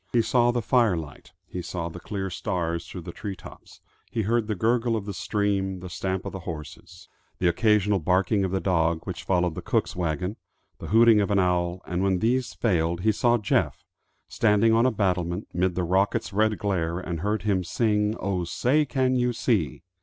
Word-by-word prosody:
He 120 Hz, -2 st, +3 dB
saw 120 Hz, +1 st, +3 dB
the 120 Hz, -1 st, 0 dB
fire 115 Hz, -6 st, +3 dB
light, 75 Hz, -4 st, -9 dB
he 90 Hz, -, -6 dB
saw 85 Hz, 0 st, -4 dB
the 85 Hz, +1 st, -8 dB
clear 95 Hz, 0 st, -4 dB
stars 85 Hz, -3 st, -2 dB
through 90 Hz, -, -8 dB
the 85 Hz, -, -7 dB
tree 100 Hz, +3 st, -6 dB
tops, -, -, -14 dB, 0.3 s
he 110 Hz, -, -2 dB
heard 115 Hz, +1 st, +1 dB
the 110 Hz, -, -1 dB
gurgle 115 Hz, +4 st, +1 dB
of 105 Hz, -3 st, -3 dB
the 100 Hz, -, -4 dB
stream, 95 Hz, -1 st, -1 dB
the 90 Hz, 0 st, -9 dB
stamp 95 Hz, +2 st, -3 dB
of -, -, -4 dB
the 95 Hz, -, -6 dB
horses, 80 Hz, -4 st, -9 dB, 0.3 s
the 90 Hz, -, +1 dB
occasional 105 Hz, +2 st, +3 dB
barking 95 Hz, +4 st, +1 dB
of 95 Hz, -, 0 dB
the 95 Hz, +1 st, -1 dB
dog 85 Hz, -3 st, +1 dB
which 90 Hz, -3 st, -5 dB
followed 90 Hz, -1 st, +1 dB
the -, -, -6 dB
cook's -, -, -1 dB
wagon, 90 Hz, +3 st, -2 dB, 0.4 s
the -, -, -7 dB
hooting 115 Hz, 0 st, +6 dB
of 100 Hz, -, -1 dB
an 100 Hz, -, +2 dB
owl; 90 Hz, -1 st, +1 dB
and 90 Hz, 0 st, -2 dB
when 95 Hz, -1 st, +2 dB
these 120 Hz, +6 st, 0 dB
failed 85 Hz, -5 st, 0 dB
he 110 Hz, +3 st, +3 dB
saw 120 Hz, +3 st, +2 dB
Jeff, 105 Hz, -, 0 dB, 0.4 s
standing 110 Hz, 0 st, +3 dB
on 115 Hz, +3 st, +4 dB
a -, -, +2 dB
battlement, 90 Hz, -3 st, -1 dB
mid 90 Hz, +1 st, 0 dB
the 90 Hz, -, 0 dB
rocket's 95 Hz, +3 st, 0 dB
red 110 Hz, +1 st, +2 dB
glare, 85 Hz, -5 st, -1 dB
and 85 Hz, -2 st, -4 dB
heard 105 Hz, +5 st, -1 dB
him 100 Hz, -3 st, +1 dB
sing, 105 Hz, +3 st, +1 dB
"Oh, 95 Hz, -2 st, -1 dB
say, 135 Hz, -, +1 dB
can 130 Hz, -2 st, +1 dB
you 125 Hz, -1 st, +1 dB
see?" 105 Hz, -, 0 dB
95 Hz, 200 wpm, -25 LUFS, 90-110 Hz, 0.4 s, hooting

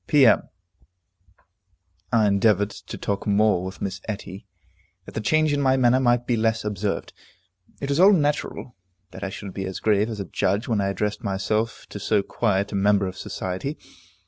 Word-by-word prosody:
P.M. 135 Hz, -7 st, +5 dB, 1.6 s
I 115 Hz, -3 st, +4 dB
endeavored 100 Hz, 0 st, +3 dB
to -, -, -9 dB
talk 100 Hz, +2 st, -3 dB
more 105 Hz, -2 st, +3 dB
with 95 Hz, +1 st, -6 dB
Miss 95 Hz, -1 st, -4 dB
Etty, 100 Hz, -1 st, -6 dB, 0.6 s
that -, -, -11 dB
the 110 Hz, -, -3 dB
change 155 Hz, +6 st, +2 dB
in 145 Hz, -, 0 dB
my 130 Hz, -1 st, +3 dB
manner 125 Hz, 0 st, +4 dB
might 120 Hz, -1 st, +2 dB
be 120 Hz, -, +1 dB
less 110 Hz, 0 st, 0 dB
observed. 105 Hz, -1 st, -3 dB, 0.7 s
It 140 Hz, -, -4 dB
was 140 Hz, +2 st, +1 dB
all 195 Hz, +3 st, +8 dB
natural 145 Hz, -7 st, -1 dB, 0.4 s
that -, -, -9 dB
I 100 Hz, -, -2 dB
should 95 Hz, -1 st, -8 dB
be 95 Hz, -, -4 dB
as 95 Hz, 0 st, -5 dB
grave 105 Hz, 0 st, +2 dB
as 110 Hz, -2 st, -5 dB
a 100 Hz, -, -3 dB
judge 100 Hz, +5 st, -1 dB
when 110 Hz, -4 st, +1 dB
I 100 Hz, -, 0 dB
addressed 105 Hz, +3 st, -2 dB
myself 110 Hz, +3 st, -1 dB
to 105 Hz, -, -7 dB
so 105 Hz, 0 st, +1 dB
quiet 100 Hz, -2 st, 0 dB
a -, -, -3 dB
member 100 Hz, 0 st, +3 dB
of 95 Hz, 0 st, -5 dB
society. 95 Hz, -, -4 dB
105 Hz, 180 wpm, -24 LUFS, 100-120 Hz, 1.6 s, all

